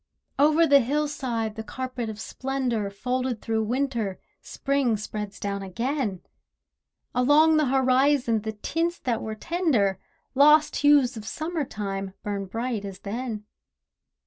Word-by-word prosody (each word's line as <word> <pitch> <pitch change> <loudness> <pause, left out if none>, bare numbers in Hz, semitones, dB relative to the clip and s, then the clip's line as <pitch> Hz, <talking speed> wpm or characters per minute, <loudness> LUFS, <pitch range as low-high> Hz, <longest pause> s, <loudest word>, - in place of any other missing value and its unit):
Over 305 +3 +5
the 280 -2 +6
hillside 260 -5 -1
the 220 - -6
carpet 255 -1 -5
of 215 -1 -7
splendour, 250 -4 -2
Folded 250 +3 -2
through 220 -1 -1
Winter, 235 -5 -1 0.2
Spring 275 -5 0
spreads 210 -1 -6
down 200 -1 -3
again; 220 - -2 0.9
Along 295 +5 +5
the 305 -2 +3
horizon, 260 -2 +3
the 220 +1 -4
tints 330 +10 -2
that 235 -3 -1
were 220 0 -4
tender, 230 - +1 0.3
Lost 300 +2 +5
hues 285 -4 +4
of 215 - -7
Summer 315 +4 -3
time, 195 -3 -5
burn 200 -1 -3
bright 230 +1 -3
as 195 -1 -8
then. 220 0 -4
245 Hz, 130 wpm, -26 LUFS, 210-280 Hz, 0.9 s, the